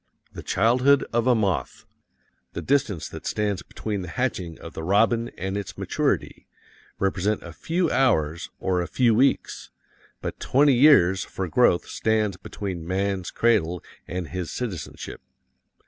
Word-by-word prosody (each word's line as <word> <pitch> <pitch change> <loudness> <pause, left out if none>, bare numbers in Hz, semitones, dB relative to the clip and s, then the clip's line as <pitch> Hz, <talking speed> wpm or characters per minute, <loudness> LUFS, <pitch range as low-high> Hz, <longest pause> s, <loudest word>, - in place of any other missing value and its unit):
The - - -7
childhood 125 +7 +3
of 120 +1 +1
a 125 - +5
moth, 100 -6 -1 0.7
the - - -4
distance 130 - 0
that - - -8
stands 105 -3 -1
between 105 +1 -5
the 90 - -6
hatching 90 -5 -3
of 85 - -10
the - - -6
robin 115 +6 +2
and 95 +2 -3
its 100 -1 -5
maturity, - - -1 0.5
represent 95 +2 0
a 85 - -9
few 170 - -1
hours 85 - +1
or 90 -1 0
a 85 - -3
few 120 -3 +3
weeks, 130 +5 +1 0.5
but - - -5
twenty 140 +1 +4
years 120 - +5
for 95 - -5
growth 90 -2 +3
stands 110 -3 0
between 90 -3 -6
man's 95 0 -1
cradle 90 -8 +1 0.2
and 90 -2 -4
his 90 +1 -4
citizenship. 100 - -6
100 Hz, 145 wpm, -24 LUFS, 90-120 Hz, 0.7 s, a